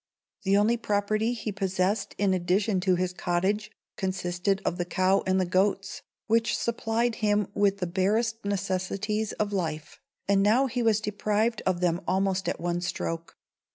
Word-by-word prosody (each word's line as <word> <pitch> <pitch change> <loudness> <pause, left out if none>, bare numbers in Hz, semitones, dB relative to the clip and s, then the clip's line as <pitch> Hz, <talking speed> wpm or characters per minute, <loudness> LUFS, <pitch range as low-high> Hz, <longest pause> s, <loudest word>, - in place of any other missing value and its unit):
The 195 0 +3
only 220 +3 +3
property 215 +1 0
he 225 -2 -4
possessed 195 +1 -1
in 200 -2 +2
addition 185 +3 +1
to 185 0 +2
his 180 0 -1
cottage 190 +5 0 0.3
consisted 185 0 -1
of 175 - -1
the - - +2
cow 185 +2 +2
and 185 0 +3
the 185 - +2
goats, 190 +2 0 0.2
which 225 0 +2
supplied 235 0 0
him 210 -2 +2
with 200 -1 +2
the 185 - -2
barest 215 +6 0
necessaries 200 +2 -1
of 205 -1 -2
life; 160 -5 -3 0.3
and 200 0 +4
now 220 +7 +4
he 250 -1 -2
was 220 -2 +3
deprived 215 +2 0
of 185 -1 +1
them 175 0 +1
almost 190 +1 +1
at - - -3
one 175 +1 -1
stroke. 165 -2 -4
195 Hz, 160 wpm, -27 LUFS, 185-215 Hz, 0.3 s, and